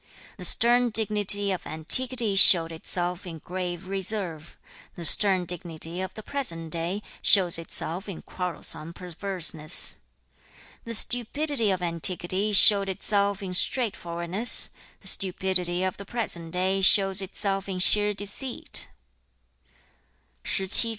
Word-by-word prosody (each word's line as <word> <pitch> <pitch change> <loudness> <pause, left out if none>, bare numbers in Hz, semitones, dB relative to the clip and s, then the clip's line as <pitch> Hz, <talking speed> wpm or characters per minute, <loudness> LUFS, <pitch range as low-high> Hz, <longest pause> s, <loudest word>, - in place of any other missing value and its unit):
The 180 - -5
stern 240 +6 +4
dignity 205 -2 +3
of 185 - -7
antiquity 230 +7 +3
showed 170 -3 +6
itself 175 +3 -4
in 165 -2 -10
grave 180 +2 -8
reserve; 190 -4 -4 0.4
the 170 - -7
stern 190 +2 +4
dignity 170 -1 -5
of 190 0 -8
the 215 - -11
present 165 - -5
day 170 +6 -5 0.2
shows 180 -4 +2
itself 170 +3 -3
in 185 - -10
quarrelsome 170 -2 -6
perverseness. 175 -3 -2 0.9
The 230 0 -1
stupidity 245 +1 +2
of 185 -2 -4
antiquity 175 +4 -2
showed 200 -1 +5
itself 200 +1 -2
in 185 -1 -7
straightforwardness; 185 -2 -1 0.3
the - - -2
stupidity 185 -2 0
of 185 -1 -5
the 200 - -11
present 190 -7 -5
day 190 +2 -2
shows 195 0 +3
itself 195 0 -5
in 190 - -6
sheer 210 +3 +6
deceit.' 205 +6 -3 1.6
[十七章]子曰/攷言令色鮮矣仁. 195 +4 +2
190 Hz, 120 wpm, -23 LUFS, 175-205 Hz, 1.6 s, showed